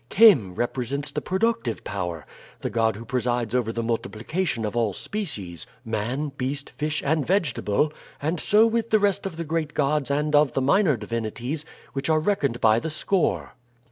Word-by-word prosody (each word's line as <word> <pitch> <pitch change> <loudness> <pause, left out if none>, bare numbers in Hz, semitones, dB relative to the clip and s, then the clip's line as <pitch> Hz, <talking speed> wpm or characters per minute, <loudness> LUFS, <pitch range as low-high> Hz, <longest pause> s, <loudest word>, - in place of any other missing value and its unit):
Khem 165 - +6
represents 130 +5 -2
the - - -2
productive 190 - 0
power 90 -5 -4 0.4
the - - -3
god 110 -2 +2
who 115 +3 -8
presides 120 -2 -1
over 120 -3 +1
the 115 0 -3
multiplication 115 +4 -1
of 105 - -3
all 115 -4 +1
species: 100 - -4 0.2
man, 120 +7 -2
beast, 135 +2 -3
fish, 150 +1 -2
and 155 +1 +2
vegetable 150 - +1 0.3
and 160 +4 -1
so 210 +6 +5
with 230 0 0
the 215 - +5
rest 200 -2 +1
of 165 -4 -8
the 170 - -3
great 155 -1 -2
gods 145 -2 +1
and 150 +2 0
of 145 -3 +4
the - - +1
minor 150 - +3
divinities, 115 +7 -4 0.3
which 135 +2 -2
are 155 -1 +4
reckoned 150 - 0
by 110 0 +5
the 160 - -4
score. 180 +4 0
140 Hz, 170 wpm, -25 LUFS, 115-160 Hz, 0.4 s, Khem